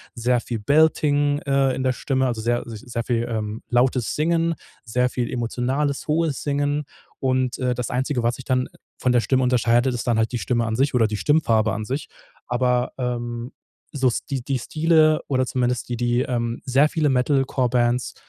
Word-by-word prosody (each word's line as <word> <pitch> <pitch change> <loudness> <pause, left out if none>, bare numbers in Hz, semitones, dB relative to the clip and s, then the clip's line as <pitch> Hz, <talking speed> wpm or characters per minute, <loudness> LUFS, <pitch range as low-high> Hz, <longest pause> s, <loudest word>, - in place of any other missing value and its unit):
sehr 120 +1 +1
viel 115 -1 -5
Belting, 145 +2 +3
äh, 135 -2 +2
in 130 - -3
der 130 - +2
Stimme, 130 +1 -1
also, 115 -3 -2
sehr, 120 +2 0
äh, - - -10
sich 110 -2 -8
sehr 120 -1 -3
viel, 120 0 -1
ähm, 110 -1 -3
lautes 125 0 +1
Singen, 165 +2 +1 0.3
sehr 125 +2 +1
viel 120 -1 -2
emotionales 130 +4 -2
hohes 155 -2 0
Singen. 145 +1 -1 0.3
Und, 130 -1 0
äh, 125 -1 0
das 125 -1 -3
Einzige, 130 0 -1
was 120 +1 +1
sich 130 - -10
dann 130 -1 0 0.3
von 125 - +1
der 125 - +4
Stimme 130 +2 +1
unterscheidet, 120 0 +2
ist 120 - -4
dann 120 -2 +2
halt 110 0 +1
die 120 - -2
Stimme 120 0 0
an 110 0 -2
sich 140 +2 +1
oder 115 -2 +4
die 105 -1 -3
Stimmfarbe 115 -6 +2
an 110 - -3
sich. 135 +5 -4 0.4
Aber, 125 0 0
ähm, 120 -1 -3 0.4
so 135 -3 +2
Sti 130 +2 -3
die 130 +1 -2
Stile 155 +3 +3
oder 130 -2 +1
zumindest 125 -1 -1
die 120 - -1
die, 120 +1 +1
ähm 120 -2 -2
sehr 140 +3 +3
viele 155 -3 0
Metal 135 +1 +2
Core 130 -2 0
Bands, 120 0 0
125 Hz, 195 wpm, -23 LUFS, 120-140 Hz, 0.4 s, der